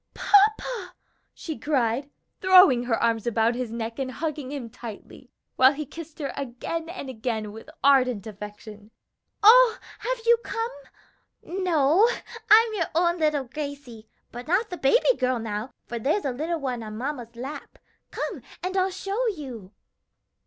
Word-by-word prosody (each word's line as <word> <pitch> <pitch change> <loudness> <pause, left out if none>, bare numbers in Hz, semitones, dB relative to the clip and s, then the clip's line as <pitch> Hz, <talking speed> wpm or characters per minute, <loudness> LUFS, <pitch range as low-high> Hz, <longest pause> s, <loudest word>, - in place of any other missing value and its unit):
"Papa!" 415 -1 +2 0.4
she 315 -3 -7
cried, 275 -2 0 0.3
throwing 365 - +6
her 240 -2 +1
arms 230 -1 0
about 230 0 +2
his 245 -2 -4
neck 230 +1 -5
and 260 -1 -2
hugging 295 -3 -4
him 275 -5 -5
tightly, 230 +2 -11 0.3
while 260 +2 +6
he 300 +1 -5
kissed 320 +2 -10
her 285 -3 -4
again 280 +6 -5
and 345 -6 -7
again 220 -4 -3
with 225 +7 -11
ardent 255 -6 +4
affection, 210 0 -10 0.5
"oh, 470 +2 +8 0.2
have - - -2
you 470 0 +6
come? 455 +1 -3 0.7
No, 355 +2 +3 0.4
I'm 445 +1 +7
your 345 -6 -1
own 345 +1 +2
little 300 -3 +1
Gracie, 275 -5 -7 0.2
but 245 +1 -8
not 385 +6 +1
the 360 - -4
baby 475 - +3
girl 255 0 +1
now, 220 +2 -4
for 235 - -5
there's 295 - 0
a 270 - 0
little 320 +6 -2
one 255 -4 -3
on 215 -1 -7
mamma's 245 -2 -5
lap. 265 +5 -8 0.3
Come, - - -4 0.2
and 370 +1 -3
I'll 375 0 +2
show 395 +6 -2
you." 260 - -6
280 Hz, 150 wpm, -25 LUFS, 235-360 Hz, 0.7 s, oh